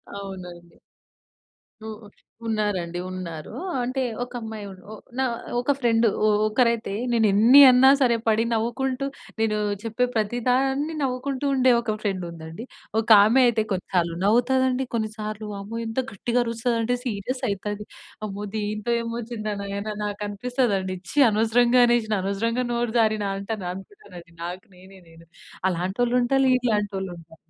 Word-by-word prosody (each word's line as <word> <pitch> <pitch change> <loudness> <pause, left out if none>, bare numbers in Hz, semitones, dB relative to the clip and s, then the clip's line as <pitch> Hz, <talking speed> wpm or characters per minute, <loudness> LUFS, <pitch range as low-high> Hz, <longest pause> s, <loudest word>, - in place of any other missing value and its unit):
అవునండి. 180 -3 -9 1.1
ఉ - - -6 0.6
ఉన్నారండి. 195 -6 -1
ఉన్నారు. 170 -4 -7 0.3
అంటే 260 +2 -2 0.2
ఒక 245 - -10
అమ్మాయి 220 -2 -6
ఉ 190 +3 -12 0.3
నా - - +3 0.4
ఒక 255 +4 +1
ఫ్రెండ్ 230 -2 +2 0.2
ఒ - - +4 0.2
ఒకరైతే 230 -2 +1 0.2
నేను 225 -2 +3
ఎన్ని 240 +7 +8
అన్నా 260 +2 +6
సరే, 240 -2 +4
పడి 220 +1 +3
నవ్వుకుంటూ, 255 +4 -1 0.3
నేను 215 -1 +1 0.3
చెప్పే 230 +2 0
ప్రతి 220 +2 0
దాన్ని 270 +5 +1
నవ్వుకుంటూ, 265 +1 -2
ఉండే 255 -1 +4
ఒక 215 -2 -2
ఫ్రెండ్ 195 -4 -2
ఉందండి. 165 +7 -9 0.3
ఒక 225 - -3 0.2
ఆమె 240 +5 +4
అయితే 225 -2 +2
కొన్నిసార్లు, 180 -2 -1
నవ్వుతది 245 +4 +3
అండి. 255 +1 -1
కొన్నిసార్లు 215 -1 -4
అమ్మో! 215 +4 -6
ఎంత 225 +3 -2
గట్టిగా 240 +5 0
అరుస్తది 230 0 -1
అంటే, 245 +2 0
సీరియస్ 245 +4 -3
అయితది. 205 +1 -4 0.4
అమ్మో! 205 0 -5
దీంతో 215 +2 -2
ఏమో 230 0 -5
వొచ్చింది 220 -2 -4
నాయన 200 +1 -5 0.2
నాకు 205 0 -4
అనిపిస్తదండి. 205 -3 -1 0.2
ఛీ! - - -10
అనవసరంగా 235 +3 +3
అనేసిన, 230 -3 +1
అనవసరంగా 230 +6 -1
నోరు 235 -1 -1
జారిన 215 -2 +2
అంటన్ 200 -1 -5
అనుకుంటాను 195 - -13
అండీ, 170 - -22
నాకు 180 +2 -6
నేనే 190 +1 -15
నేను, 165 0 -17 0.4
అలాంటోల్లు 195 +8 0
ఉంటలు, 270 +2 +2 0.2
ఇలంటోళ్ళు 200 -3 -1
ఉంటా 165 -1 -15
220 Hz, 140 wpm, -24 LUFS, 200-245 Hz, 1.1 s, ఎన్ని